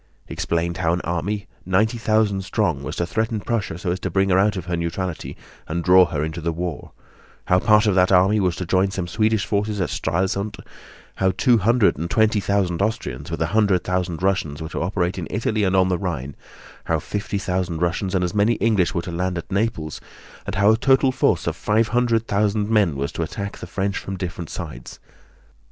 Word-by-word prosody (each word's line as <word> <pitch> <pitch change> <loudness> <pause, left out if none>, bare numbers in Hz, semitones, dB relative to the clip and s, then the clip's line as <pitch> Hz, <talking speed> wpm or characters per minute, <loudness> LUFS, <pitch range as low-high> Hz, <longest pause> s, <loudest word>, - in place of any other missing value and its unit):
He - - -7
explained 85 +1 -1
how 85 -2 +1
an 90 - -1
army, 95 +5 -2 0.2
ninety 110 +6 +1
thousand 110 -3 +1
strong, 95 - 0
was - - -5
to 85 - -1
threaten 110 +5 -1
Prussia 100 -6 -2
so 90 0 -2
as 90 - -2
to 95 - -3
bring 95 +2 +1
her 95 0 +4
out 100 +1 +2
of 90 - -5
her 90 0 -2
neutrality 85 +1 -4 0.3
and 85 +2 -2
draw 90 +1 +7
her 75 -3 -2
into 80 +2 -4
the 85 +1 -1
war; 85 -1 -5 0.5
how 90 - +3
part 105 +2 +4
of 105 - +3
that 95 0 +3
army 95 +3 +4
was 90 -4 +1
to 90 - -4
join 95 +3 +2
some 95 -2 -4
Swedish 110 +2 +1
forces 105 0 -1
at 90 - -1
Stralsund; 100 +4 -1 0.6
how 95 - +2
two 120 -3 +4
hundred 110 - +3
and 85 +2 -3
twenty 110 0 +3
thousand 95 -3 0
Austrians, 80 - -2
with 80 -1 -1
a 80 - -3
hundred 100 -5 +3
thousand 90 -2 -2
Russians, 90 -7 0
were 80 -1 -6
to - - -4
operate 90 +1 -1
in 85 - -5
Italy 110 0 -1
and 95 -1 +2
on 95 -1 +4
the 90 - 0
Rhine; 70 -8 -4 0.5
how - - +1
fifty 105 0 -3
thousand 90 -3 -2
Russians 90 +2 -1
and 90 - +2
as 90 - -1
many 105 +3 +3
English 105 -5 +1
were 85 - -1
to 90 - -6
land 90 +1 -2
at 85 - -7
Naples, 95 -7 -2 0.5
and - - -3
how 100 +1 +5
a 110 - +3
total 135 +2 +3
force 130 - +1
of - - -1
five 110 +1 +1
hundred 115 -1 +1
thousand 105 0 0
men 100 -9 +3
was 70 +1 -2
to - - -5
attack 100 0 -5
the - - -7
French 100 0 -2
from 95 0 -6
different 85 -3 -5
sides. - - -8
95 Hz, 215 wpm, -22 LUFS, 85-105 Hz, 0.6 s, draw